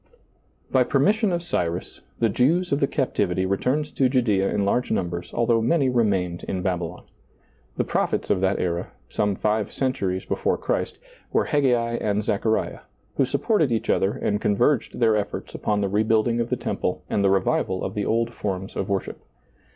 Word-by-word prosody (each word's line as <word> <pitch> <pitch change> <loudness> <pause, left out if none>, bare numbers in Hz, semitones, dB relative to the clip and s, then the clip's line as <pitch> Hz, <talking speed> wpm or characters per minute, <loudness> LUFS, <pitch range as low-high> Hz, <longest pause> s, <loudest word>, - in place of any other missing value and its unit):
Bv - - +3
permission 215 -1 +3
of 170 -1 -1
Cyrus, 85 - -3 0.2
the 115 - +2
Jews 155 - +2
of 140 - +2
the 140 - +2
Cap - - -1
tivity 95 0 0
returned 125 +10 0
to 130 -2 +3
Judcea 110 -7 +2
in 100 - 0
large 125 +5 +1
numbers, 85 -1 -2
al 120 - 0
though 115 -1 +3
many 135 +3 +2
remained 95 -8 0
in 95 -1 -3
Babylon. 90 -2 -2 0.7
The - - +2
proph - - 0
ets - - -3
of 95 - +2
that 95 +1 +2
era, 85 -1 -1 0.2
some 105 -1 0
five 105 +1 0
centuries 95 -9 -1
before - - 0
Christ, - - -2 0.3
were - - +2
Haggai 120 -5 +1
and 105 0 0
Zechariah, 110 +2 0 0.4
who 135 - +4
supported 160 - +1
each 115 - 0
other 95 - +2
and 105 0 -1
convei^ed 120 +6 +1
their 115 -2 +3
efforts 105 -1 -3
upon 105 -1 -1
the 100 - +1
re 100 +2 +1
building 110 +1 +2
of 115 - -3
the - - +1
temple - - -2
and 100 - 0
the 100 - +4
revival 95 -1 +1
of 95 - -3
the 105 -1 -2
old 115 +1 0
forms 95 -3 -4
of 95 - -3
worship. 100 -2 -2
105 Hz, 185 wpm, -24 LUFS, 95-125 Hz, 0.7 s, who